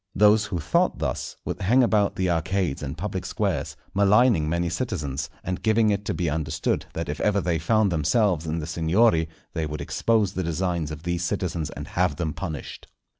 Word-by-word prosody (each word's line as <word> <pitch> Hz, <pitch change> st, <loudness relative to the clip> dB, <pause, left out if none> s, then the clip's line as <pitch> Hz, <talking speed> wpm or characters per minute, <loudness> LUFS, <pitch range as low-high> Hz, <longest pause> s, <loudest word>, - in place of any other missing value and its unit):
Those 105 Hz, +2 st, +5 dB
who 100 Hz, -3 st, -3 dB
thought 75 Hz, -, +1 dB
thus, -, -, -3 dB
would -, -, -4 dB
hang 125 Hz, +7 st, +4 dB
about 105 Hz, -4 st, +2 dB
the 95 Hz, -, 0 dB
arcades 85 Hz, -2 st, 0 dB
and 75 Hz, +2 st, -5 dB
public 95 Hz, +1 st, -3 dB
squares, -, -, -2 dB, 0.2 s
maligning 100 Hz, -4 st, +4 dB
many 85 Hz, +1 st, 0 dB
citizens, 80 Hz, -, -3 dB
and 90 Hz, 0 st, -3 dB
giving 110 Hz, 0 st, +3 dB
it 100 Hz, 0 st, -1 dB
to 105 Hz, -, -2 dB
be 90 Hz, -, -1 dB
understood 75 Hz, 0 st, -1 dB
that 85 Hz, 0 st, -3 dB
if 75 Hz, +2 st, -4 dB
ever 105 Hz, -1 st, +2 dB
they 85 Hz, -4 st, 0 dB
found 110 Hz, +4 st, +2 dB
themselves 85 Hz, -, +1 dB
in 80 Hz, +1 st, -1 dB
the 80 Hz, -, -3 dB
Signory, 80 Hz, +1 st, +2 dB, 0.2 s
they 80 Hz, -1 st, -2 dB
would 75 Hz, 0 st, -5 dB
expose 110 Hz, -4 st, +1 dB
the 95 Hz, -, -2 dB
designs 85 Hz, -1 st, -1 dB
of 75 Hz, 0 st, -7 dB
these 85 Hz, 0 st, -1 dB
citizens 85 Hz, -4 st, -2 dB
and -, -, -8 dB
have 90 Hz, -4 st, +1 dB
them 80 Hz, 0 st, -2 dB
punished. 80 Hz, -8 st, -6 dB
90 Hz, 190 wpm, -25 LUFS, 80-100 Hz, 0.2 s, Those